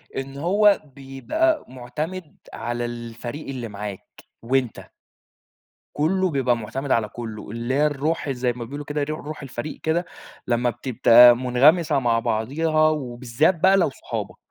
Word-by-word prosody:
إن 135 +1 -5
هو 200 +6 +3
بيبقى 300 - -1
مُعتمد 150 +7 -6 0.2
على 120 +1 -3
الفريق 120 +4 -7
اللي 125 -4 -5
معاك 100 -1 -8 0.2
وأنتَ. 125 -1 0 1.1
كله 185 +5 +1
بيبقى 130 -5 +1
مُعتمد 130 +5 -5
على 110 -2 +1
كله، 110 -2 -8
اللي 115 +3 -3
هي 150 +2 +3
الروح 150 +1 -1
زي 125 -2 0
ما 120 0 -7
بيقولوا 145 +5 -7
كده 145 0 -2
رو 155 +1 -4
روح 150 -1 -8
الفريق 135 +2 -6
كده 165 +3 0 0.4
لما 120 0 +1
بتبقى 120 -1 +6
مُنغمسة 140 +5 +3
مع 120 -3 +2
بعضها، 155 +9 +1
وبالذات 130 +1 0
بقى 190 +2 +5
لو 175 -7 +2
صحابك. - - -6
135 Hz, 140 wpm, -23 LUFS, 120-155 Hz, 1.1 s, بتبقى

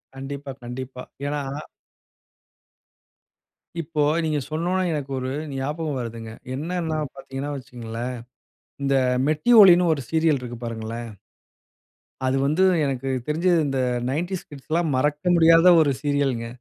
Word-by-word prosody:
கண்டிப்பா, 140 +1 -6
கண்டிப்பா. 125 +1 -7 0.2
ஏன்னா 145 0 -2 2.4
இப்போ 155 -1 -2 0.2
நீங்க 155 -2 0
சொன்னோனே 175 +4 0
எனக்கு 140 -2 -4
ஒரு 130 0 -3 0.2
ஞாபகம் 145 +2 -3
வருதுங்க. 115 -1 -6 0.2
என்னன்னா 160 +2 -2 0.2
பார்த்தீங்கன்னா 140 -4 -6
வச்சுக்கங்களேன். 120 -2 -6 0.7
இந்த 140 0 +1 0.3
மெட்டி 155 +10 +1
ஒலின்னு 180 -3 +7
ஒரு 145 - -4
சீரியல் 160 -3 +2
இருக்கு 120 -1 -7
பாருங்களேன்! 115 0 -5 1.2
அது 130 +1 +1
வந்து 155 +6 +2 0.2
எனக்கு 135 -1 -2 0.2
தெரிஞ்சு 165 +4 +1 0.2
இந்த 135 -1 -1 0.3
90s 175 +7 -3
கிட்ஸ்ல்லாம் 155 +3 -1
மறக்க 150 +6 +1
முடியாத 165 +1 +7
ஒரு 145 - +3
சீரியல்ங்க. 140 -5 0
145 Hz, 110 wpm, -24 LUFS, 130-160 Hz, 2.4 s, ஒலின்னு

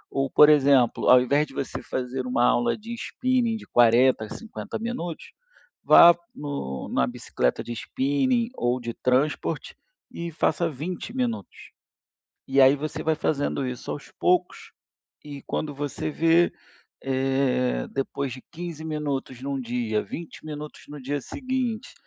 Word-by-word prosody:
Ou, 135 0 +1
por 150 - +7
exemplo, 140 -5 +4
ao 125 - +9
invés 140 +4 +2
de 135 - -15
você 135 - -4
fazer 130 0 -4
uma 120 -1 +2
aula 240 - +2
de 225 +2 -8
spinning 245 -1 0
de - - -12
40 120 0 +4
a - - -12
50 225 -1 -7
minutos, 215 -8 -5 0.6
vá 170 0 +8 0.2
no 140 - -5
na 65 - +1
bicicleta 60 - -2
de - - -7
spinning, 230 - 0
ou 120 +1 0
de 120 -1 -5
transport 130 +6 0 0.4
e 170 0 -5
faça 165 +2 0
20 170 - -6
minutos. 240 -3 -4 0.8
E 135 +1 +3
aí, 135 +2 +6
você 150 +2 -4
vai 160 - +1
fazendo 145 -3 -1
isso 125 -1 -6
aos 145 - -7
poucos, 180 0 0 0.5
e 145 -2 -8
quando 150 -2 -3
você 145 0 -4
vê, 165 +3 +3 0.5
eh, 135 -1 0
depois 135 0 -3
de 130 - -8
15 170 -2 -7
minutos 140 -5 -3
num 140 0 -3
dia, 120 -3 -1
20 165 -1 -9
minutos 150 0 -7
no 145 0 -8
dia 145 +2 -2
seguinte, 255 - -3
145 Hz, 145 wpm, -25 LUFS, 130-170 Hz, 0.8 s, ao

